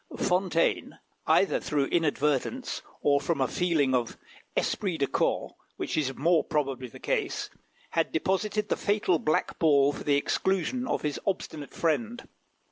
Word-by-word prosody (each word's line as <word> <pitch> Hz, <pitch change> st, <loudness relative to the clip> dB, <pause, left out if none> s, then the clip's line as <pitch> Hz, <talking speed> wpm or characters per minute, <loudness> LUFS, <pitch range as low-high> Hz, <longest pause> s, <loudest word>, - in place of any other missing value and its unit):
Fontaine, 180 Hz, -3 st, +1 dB, 0.3 s
either -, -, +4 dB
through 145 Hz, -2 st, 0 dB
inadvertence 150 Hz, -, 0 dB, 0.2 s
or 140 Hz, -1 st, +3 dB
from 165 Hz, -2 st, -1 dB
a 130 Hz, -, +2 dB
feeling 160 Hz, -7 st, +1 dB
of 120 Hz, -2 st, 0 dB, 0.4 s
esprit 190 Hz, -6 st, 0 dB
de 140 Hz, -, +2 dB
corps, -, -, 0 dB, 0.2 s
which -, -, -3 dB
is 135 Hz, -4 st, 0 dB
more 165 Hz, +3 st, +3 dB
probably 135 Hz, -4 st, -2 dB
the 115 Hz, -, -12 dB
case, -, -, -2 dB, 0.4 s
had 165 Hz, -1 st, 0 dB
deposited 205 Hz, +5 st, 0 dB
the -, -, +2 dB
fatal 200 Hz, -5 st, +1 dB
black 155 Hz, -, 0 dB
ball 145 Hz, -3 st, +4 dB
for -, -, -7 dB
the 145 Hz, -, +3 dB
exclusion 195 Hz, -, 0 dB
of -, -, -1 dB
his 150 Hz, -2 st, -2 dB
obstinate 160 Hz, -6 st, -3 dB
friend. 230 Hz, +8 st, -1 dB
160 Hz, 145 wpm, -28 LUFS, 140-190 Hz, 0.4 s, either